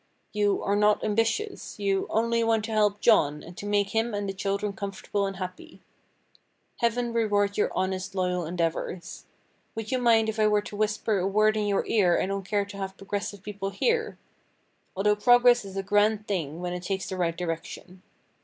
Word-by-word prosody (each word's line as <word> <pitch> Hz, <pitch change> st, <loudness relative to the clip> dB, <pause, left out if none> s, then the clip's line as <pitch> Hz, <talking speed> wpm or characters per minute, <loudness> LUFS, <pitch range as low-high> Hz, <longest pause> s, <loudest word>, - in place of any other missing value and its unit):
You 205 Hz, -1 st, +1 dB
"are 200 Hz, -, +1 dB
not 210 Hz, 0 st, +3 dB
ambitious;" 225 Hz, -, -1 dB
you 195 Hz, -1 st, 0 dB
"only 230 Hz, +1 st, +1 dB
want 225 Hz, -1 st, +1 dB
to 225 Hz, -, -6 dB
help 210 Hz, -1 st, +2 dB
John, 150 Hz, -10 st, +3 dB
and 170 Hz, -, -11 dB
to 205 Hz, -, -6 dB
make 205 Hz, -1 st, +1 dB
him 225 Hz, 0 st, 0 dB
and 205 Hz, 0 st, -2 dB
the 195 Hz, -, -3 dB
children 200 Hz, +1 st, -2 dB
comfortable 200 Hz, 0 st, -3 dB
and 195 Hz, -, -5 dB
happy." 185 Hz, 0 st, -8 dB, 1.0 s
Heaven 235 Hz, 0 st, 0 dB
reward 205 Hz, -3 st, +1 dB
your 210 Hz, -, +1 dB
honest, 190 Hz, +1 st, -2 dB
loyal 180 Hz, -1 st, 0 dB
endeavors! 170 Hz, +2 st, -3 dB, 0.5 s
Would 225 Hz, +2 st, -5 dB
you 255 Hz, -, +1 dB
mind 230 Hz, -2 st, +4 dB
if 220 Hz, 0 st, -3 dB
I 215 Hz, -, +4 dB
were 210 Hz, -1 st, +2 dB
to 210 Hz, -, -8 dB
whisper 210 Hz, 0 st, 0 dB
a 185 Hz, -, 0 dB
word 215 Hz, +2 st, +3 dB
in 210 Hz, -1 st, 0 dB
your 200 Hz, -1 st, +1 dB
ear 185 Hz, -6 st, +3 dB
I -, -, +1 dB
don't 195 Hz, +1 st, -2 dB
care 205 Hz, -1 st, +1 dB
to 200 Hz, 0 st, -10 dB
have 195 Hz, 0 st, -5 dB
progressive 200 Hz, 0 st, -5 dB
people 200 Hz, -1 st, -4 dB
hear?—although 210 Hz, -, -3 dB
progress 245 Hz, +1 st, +5 dB
is 195 Hz, 0 st, -8 dB
a 195 Hz, -, -1 dB
grand 210 Hz, +1 st, +2 dB
thing 165 Hz, -5 st, -3 dB
when 180 Hz, 0 st, -3 dB
it 180 Hz, -, -4 dB
takes 190 Hz, +1 st, -3 dB
the 190 Hz, -, -4 dB
right 170 Hz, -2 st, -1 dB
direction. 180 Hz, +2 st, -6 dB
205 Hz, 190 wpm, -27 LUFS, 190-215 Hz, 1.0 s, progress